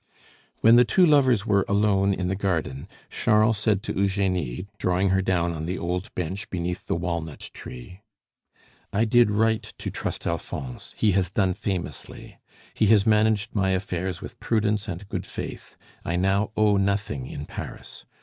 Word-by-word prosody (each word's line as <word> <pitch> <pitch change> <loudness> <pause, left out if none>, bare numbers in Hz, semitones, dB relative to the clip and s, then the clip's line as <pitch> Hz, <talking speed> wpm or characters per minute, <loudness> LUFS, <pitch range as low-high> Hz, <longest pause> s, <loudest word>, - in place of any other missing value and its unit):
When 115 +2 +7
the 125 - +8
two 150 - +4
lovers 130 - +4
were 100 -3 +3
alone 100 -1 +3
in 95 -2 -1
the 95 - 0
garden, 85 -8 -2 0.2
Charles 110 0 +3
said 105 -2 +1
to - - -3
Eugenie, 95 - 0
drawing 90 +2 +1
her 95 0 +2
down 85 -2 +1
on 80 -1 -5
the 90 +2 -2
old 90 +2 -3
bench 90 +4 -4
beneath 90 0 -4
the - - 0
walnut 85 -3 -4
tree, 65 +11 -10 0.9
"I 105 +3 +2
did 120 0 +4
right 110 +1 +2
to - - -7
trust - - -4
Alphonse; 70 -6 -5
he 105 - +3
has 95 -2 +1
done 95 0 +1
famously. 90 - -5 0.3
He 110 - +2
has 105 -2 +5
managed 110 -1 +2
my 95 -3 +1
affairs 90 -1 -3
with - - -9
prudence 105 -1 0
and 95 +1 -6
good - - -4
faith. - - -7 0.3
I 85 - -2
now 95 +3 +1
owe 105 -2 +4
nothing 100 -9 -1
in 70 - -6
Paris. - - -8
95 Hz, 165 wpm, -25 LUFS, 90-105 Hz, 0.9 s, the